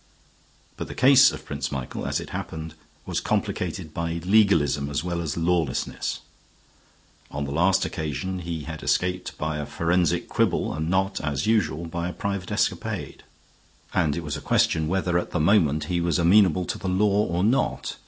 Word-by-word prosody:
But -, -, -5 dB
the -, -, -8 dB
case 135 Hz, +1 st, +7 dB
of -, -, -9 dB
Prince -, -, -4 dB
Michael, 65 Hz, -3 st, -4 dB
as -, -, 0 dB
it -, -, -8 dB
happened, 80 Hz, 0 st, -5 dB, 0.3 s
was -, -, -1 dB
complicated 80 Hz, -, -2 dB
by 85 Hz, 0 st, -2 dB
legalism 85 Hz, -9 st, +3 dB
as 75 Hz, +1 st, -2 dB
well 85 Hz, -1 st, -2 dB
as 80 Hz, -2 st, -3 dB
lawlessness. 85 Hz, -5 st, -1 dB, 1.1 s
On 70 Hz, 0 st, -4 dB
the 70 Hz, -, -5 dB
last 90 Hz, +6 st, +2 dB
occasion 80 Hz, +5 st, -3 dB
he 85 Hz, -2 st, -4 dB
had 80 Hz, -1 st, -7 dB
escaped 90 Hz, 0 st, -1 dB
by 80 Hz, 0 st, -2 dB
a 75 Hz, -, -3 dB
forensic 85 Hz, -1 st, +1 dB
quibble -, -, 0 dB
and 80 Hz, +2 st, -3 dB
not, 95 Hz, +1 st, 0 dB
as 70 Hz, -3 st, -1 dB
usual, 85 Hz, -7 st, +1 dB
by 85 Hz, +1 st, -3 dB
a -, -, -6 dB
private 100 Hz, -2 st, -4 dB
escapade; -, -, -2 dB, 0.7 s
and 75 Hz, -2 st, +1 dB
it 85 Hz, -, -4 dB
was 75 Hz, -1 st, -3 dB
a 75 Hz, -, -6 dB
question 80 Hz, -1 st, +2 dB
whether 90 Hz, 0 st, +1 dB
at -, -, -5 dB
the 90 Hz, -, -2 dB
moment 80 Hz, -4 st, +3 dB
he 85 Hz, +2 st, -1 dB
was 85 Hz, +1 st, +1 dB
amenable 90 Hz, 0 st, +4 dB
to 110 Hz, +2 st, -4 dB
the 95 Hz, -, -3 dB
law 100 Hz, +2 st, +3 dB
or 85 Hz, +2 st, -1 dB
not. 115 Hz, +6 st, 0 dB
85 Hz, 175 wpm, -25 LUFS, 75-95 Hz, 1.1 s, case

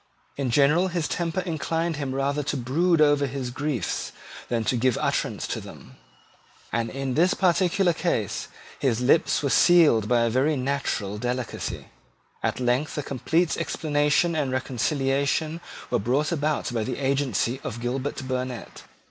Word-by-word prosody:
In 135 Hz, -2 st, -2 dB
general 150 Hz, +8 st, +4 dB
his 170 Hz, -4 st, -1 dB
temper 170 Hz, +1 st, -1 dB
inclined 165 Hz, -1 st, -2 dB
him 135 Hz, -3 st, -3 dB
rather 140 Hz, +2 st, 0 dB
to 145 Hz, 0 st, -2 dB
brood 155 Hz, +7 st, +2 dB
over 145 Hz, -1 st, +4 dB
his 130 Hz, -2 st, -4 dB
griefs 140 Hz, -1 st, -2 dB, 0.4 s
than 115 Hz, -2 st, 0 dB
to 125 Hz, -, 0 dB
give 125 Hz, 0 st, +2 dB
utterance -, -, -1 dB
to -, -, -3 dB
them; 65 Hz, -, -12 dB, 0.8 s
and 115 Hz, 0 st, 0 dB
in 135 Hz, +1 st, -3 dB
this 175 Hz, +6 st, +3 dB
particular 180 Hz, 0 st, +2 dB
case 155 Hz, -, -1 dB, 0.3 s
his 120 Hz, -4 st, +1 dB
lips 135 Hz, +1 st, +3 dB
were 140 Hz, -, +1 dB
sealed 155 Hz, -, +5 dB
by 120 Hz, 0 st, +3 dB
a 115 Hz, -, +2 dB
very 135 Hz, +6 st, +2 dB
natural 130 Hz, -7 st, -2 dB
delicacy. 125 Hz, +1 st, -4 dB, 0.5 s
At -, -, -1 dB
length 125 Hz, +5 st, 0 dB
a 150 Hz, -, -1 dB
complete 160 Hz, +6 st, 0 dB
explanation 150 Hz, +2 st, +1 dB
and 145 Hz, -4 st, 0 dB
reconciliation 135 Hz, +5 st, 0 dB, 0.3 s
were 120 Hz, -, +2 dB
brought 130 Hz, -, 0 dB
about 150 Hz, -5 st, -1 dB
by 115 Hz, -2 st, 0 dB
the 125 Hz, -, -3 dB
agency 135 Hz, -3 st, 0 dB
of 115 Hz, -, -5 dB
Gilbert 130 Hz, +2 st, -3 dB
Burnet. 130 Hz, -2 st, -4 dB
140 Hz, 150 wpm, -25 LUFS, 125-155 Hz, 0.8 s, sealed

